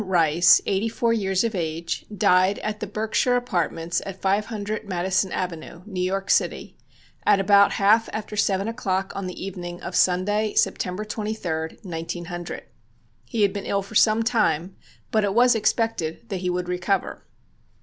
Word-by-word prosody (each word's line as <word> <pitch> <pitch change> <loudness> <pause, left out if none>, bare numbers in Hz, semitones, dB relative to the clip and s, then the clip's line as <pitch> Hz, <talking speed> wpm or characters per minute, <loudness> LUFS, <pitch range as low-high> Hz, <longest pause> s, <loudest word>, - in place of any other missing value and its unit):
Rice, 175 -2 +5
eighty 200 +3 0
four 230 +1 +1
years 195 -3 +1
of 230 -1 -1
age, 165 -2 -3
died 185 -1 +3
at 215 0 -3
the 215 - -4
Berkshire 220 +4 0
Apartments 170 -7 -1
at 190 -1 -8
500 205 +1 -2
Madison 190 +1 0
Avenue, 170 -1 -5
New 190 -4 -4
York 195 +2 -1
City, - - 0 0.5
at 205 -1 +4
about 200 +1 +5
half 215 +3 +3
after 215 0 -5
seven 200 -1 +1
o'clock 195 -5 -2
on 195 -1 -4
the 180 +1 -6
evening 175 -2 -6
of 180 - -5
Sunday, 205 +4 +2
September 185 +3 0
23, 210 -7 -4
1900. 175 0 -6 0.6
He 220 -3 0
had 200 -1 +2
been 200 -1 -5
ill 200 0 0
for 200 - -13
some 215 +1 +4
time, 195 -6 0 0.4
but 215 -1 +2
it 200 0 0
was 245 +1 +6
expected 225 -3 -1
that 195 - -2
he 180 0 -2
would 180 0 -2
recover. 180 +2 -2
195 Hz, 160 wpm, -24 LUFS, 180-215 Hz, 0.6 s, was